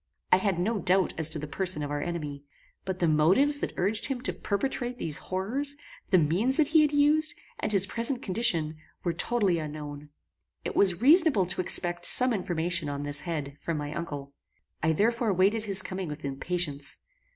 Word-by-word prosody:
I - - +6
had 190 -2 -1
no 205 +5 -1
doubt 185 0 +2
as 160 -1 +5
to 160 - -3
the 150 - -5
person 165 0 -2
of 145 - -5
our 145 0 -3
enemy; 150 -4 -5 0.4
but 190 -1 -4
the 175 - 0
motives 185 - +3
that - - -5
urged 205 +4 0
him 265 -2 -3
to - - -3
perpetrate 245 +3 -4
these 155 -9 -4
horrors, 250 +10 -3 0.3
the 185 - +4
means 180 - +1
that 305 -2 +2
he 315 -1 +5
used, 300 +2 +2 0.2
and - - -2
his 195 -2 +3
present 235 +5 -3
condition, 170 -7 0 0.3
were 170 - -1
totally 195 -2 0
unknown. 150 -1 -8 0.6
It - - -4
was 185 -1 +2
reasonable 295 - +4
to 185 +1 -2
expect 175 -1 +2
some 255 -1 +9
information 175 -5 -2
on 140 0 -5
this 145 -1 +1
head, 150 -5 -5
from 165 -2 -4
my 145 0 -5
uncle. 145 -5 -7 0.5
I 160 - +1
therefore 225 +5 0
waited 200 +5 +1
his 195 -2 +3
coming 185 0 -5
with 150 -1 -8
impatience. 140 0 -1
180 Hz, 185 wpm, -27 LUFS, 155-225 Hz, 0.6 s, some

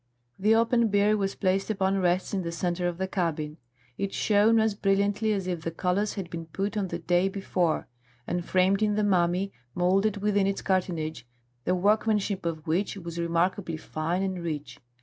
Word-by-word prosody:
The 215 +3 +4
open 230 +1 +3
bier 205 +1 +3
was 195 -2 -1
placed 195 +1 0
upon 195 -2 +1
rests 180 +1 +1
in 195 - 0
the 170 -1 -4
centre 175 +1 -1
of 175 -1 -3
the 190 +1 -2
cabin; 160 -5 -2 0.4
it 195 0 -1
shone 215 +2 +4
as 220 -1 +2
brilliantly 205 +2 +1
as 195 -3 -1
if 175 -3 -2
the 165 - -2
colours 180 +5 -1
had 195 -4 -4
been 165 -1 -6
put 195 +6 -3
on 200 -3 0
the 170 - -4
day 175 +3 +2
before, 185 -4 -1 0.4
and 175 0 -2
framed 190 +3 +2
in 210 -1 +2
the 210 - +1
mummy, 185 0 +2 0.2
moulded 195 +4 +2
within 200 -1 +2
its 195 - -2
cartonnage, 165 - -1 0.4
the 180 - +2
workmanship 205 -1 +1
of 160 -1 -4
which 185 +5 0
was 170 -2 -6
remarkably 170 0 0
fine 165 +4 -2
and 190 -2 -2
rich. 150 -3 -5
190 Hz, 185 wpm, -27 LUFS, 170-205 Hz, 0.4 s, The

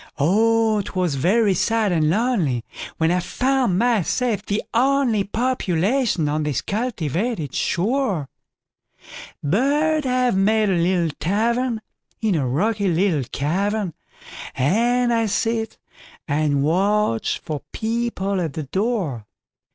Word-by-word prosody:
Oh! 220 +6 +3
'twas 185 -5 -1
very 195 - +2
sad 220 +2 +1
and 160 -3 +2
lonelyWhen 165 - -1
I 180 - +2
found 255 -1 0
myself 230 0 +1
the 205 0 -2
onlyPopulation 235 - +1
on 150 +1 0
this 150 -3 -1
cultivated 200 - -2
shore; 200 - 0 1.2
But 285 - +1
I've 250 -3 +1
made 210 +1 +2
a - - +2
little 170 -2 +1
tavernIn 230 - 0 0.5
a 140 -5 0
rocky 200 - 0
little 170 -5 +1
cavern, 190 +5 -1 0.6
And 235 - +2
I 230 -1 +1
sit 225 +2 -1 0.5
and 145 -1 +1
watch 190 - +1
for 155 -4 -5
people 220 -4 -2
at 160 -5 -3
the 155 - -4
door. 175 - -2
200 Hz, 105 wpm, -22 LUFS, 165-235 Hz, 1.2 s, Oh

